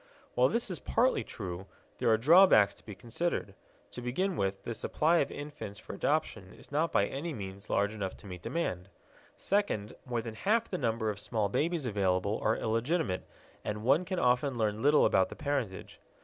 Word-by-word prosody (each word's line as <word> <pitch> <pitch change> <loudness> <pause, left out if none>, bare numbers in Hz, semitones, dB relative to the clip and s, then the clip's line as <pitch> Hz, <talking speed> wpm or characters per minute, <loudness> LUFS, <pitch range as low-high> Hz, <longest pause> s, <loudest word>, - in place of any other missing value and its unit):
While 125 +1 +4
this 235 -3 0
is 180 - -2
partly 255 +3 +2
true, 95 -3 -6 0.3
there - - +2
are 110 - +5
drawbacks 145 - +6
to - - -19
be 105 - -9
considered. 120 - -2 0.4
To 125 - -7
begin 175 +11 -1
with, 95 -3 -2
the 115 - -3
supply 160 +8 +1
of 140 - +1
infants 145 -8 -7
for - - -9
adoption 145 -11 -1
is - - -15
not 155 +3 +1
by 100 - +3
any 150 +8 -4
means 100 -3 -8
large 100 +1 +1
enough 100 -3 -4
to - - -16
meet 90 -3 -8
the - - -5
demand. 95 - -2 0.5
Second, 195 - -1
more 120 -3 -2
than 115 -1 -6
half 220 - 0
the 185 - -2
number 110 -1 0
of 105 - -7
small 105 -1 -1
babies 160 - 0
available 100 -2 0
are 110 - +2
illegitimate, 115 - -1 0.4
and 105 0 -4
one 140 +8 +4
can 185 +1 -3
often 125 0 +2
learn 110 -1 0
little 145 +2 +5
about 95 - +3
the - - -8
parentage. 140 -10 -3
115 Hz, 190 wpm, -31 LUFS, 100-155 Hz, 0.5 s, drawbacks